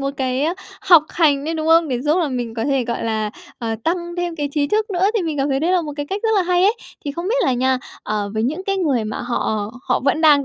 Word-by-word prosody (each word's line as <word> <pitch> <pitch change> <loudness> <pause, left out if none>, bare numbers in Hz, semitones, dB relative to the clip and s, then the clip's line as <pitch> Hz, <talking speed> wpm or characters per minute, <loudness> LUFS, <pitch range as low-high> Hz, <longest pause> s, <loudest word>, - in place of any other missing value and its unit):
một 275 0 -1
cái, 260 0 -1
ơ, 335 +3 0 0.3
học 345 -5 +7
hành 290 -5 +2
đấy, 325 +2 -2
đúng 315 0 -2
không? 330 0 +5
Để 250 -3 -1
giúp 300 +6 +2
là 325 -4 +1
mình 240 -3 -3
có 225 - -2
thể, 270 -3 +1
gọi 235 -1 -3
là, 215 -2 -1 0.3
ờ, 225 -2 -2
tăng 345 +1 -2
thêm 350 -1 -2
cái 290 -1 -2
trí 290 -2 +1
thức 430 0 0
nữa 370 +1 +2
thì 390 - +1
mình 315 -3 -3
cảm 275 +1 +1
thấy 270 0 0
đấy 345 +3 +1
là 360 - +3
một 300 -2 -5
cái 290 0 -3
cách 395 +6 -4
rất 450 - +1
là 380 - +4
hay 360 0 +2
ấy. 420 +4 +4 0.3
Thì 285 - -3
không 340 +5 -4
biết - - +2
là 260 - +2
nha, 260 +1 +1 0.2
ờ, 210 -1 -2
với 220 - 0
những 315 +10 -2
cái 390 0 0
người 280 - +1
mà 215 - -4
họ 220 -4 -2 0.2
họ - - +2
vẫn 295 +3 +2
đang 295 -3 +5
295 Hz, 295 wpm, -20 LUFS, 255-345 Hz, 0.3 s, học